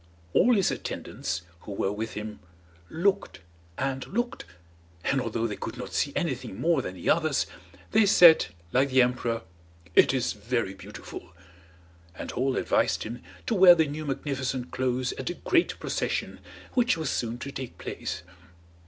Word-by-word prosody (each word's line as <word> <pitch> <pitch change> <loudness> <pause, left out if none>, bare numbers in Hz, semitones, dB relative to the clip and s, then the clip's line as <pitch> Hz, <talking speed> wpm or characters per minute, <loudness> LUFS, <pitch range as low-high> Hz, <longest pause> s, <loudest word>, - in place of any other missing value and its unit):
All 245 0 +5
his 195 -3 +3
attendants, - - -4 0.2
who 100 - -8
were 100 0 0
with 110 +2 -4
him, 105 0 -6 0.5
looked 180 - 0 0.4
and 135 -1 -2
looked, 240 +4 -2 0.6
and 135 -1 +1
although 115 -1 -1
they 105 -3 -2
could - - -6
not - - -7
see - - +1
anything 95 - -2
more 165 -4 +3
than 95 - -6
the 90 - -7
others, 155 -5 +3 0.5
they 215 -1 +5
said, 175 -4 +8 0.3
like 135 +2 +3
the 130 -1 +6
emperor, 120 -2 -1 0.5
"It - - +6
is 130 -2 0
very 105 -1 -2
beautiful." 95 - -10 0.8
And - - -6
all 130 +1 0
advised - - +1
him 120 +2 -6 0.2
to - - 0
wear 185 -3 +9
the 160 -2 +3
new 150 +1 -5
magnificent 130 -2 -2
clothes 130 -1 0
at 130 - -3
a 175 - -3
great 345 - +1
procession - - -2 0.3
which 245 -8 +3
was 160 -4 -1
soon 120 0 -2
to 140 +3 -6
take 130 -3 -7
place. - - -5
130 Hz, 160 wpm, -27 LUFS, 115-165 Hz, 0.8 s, wear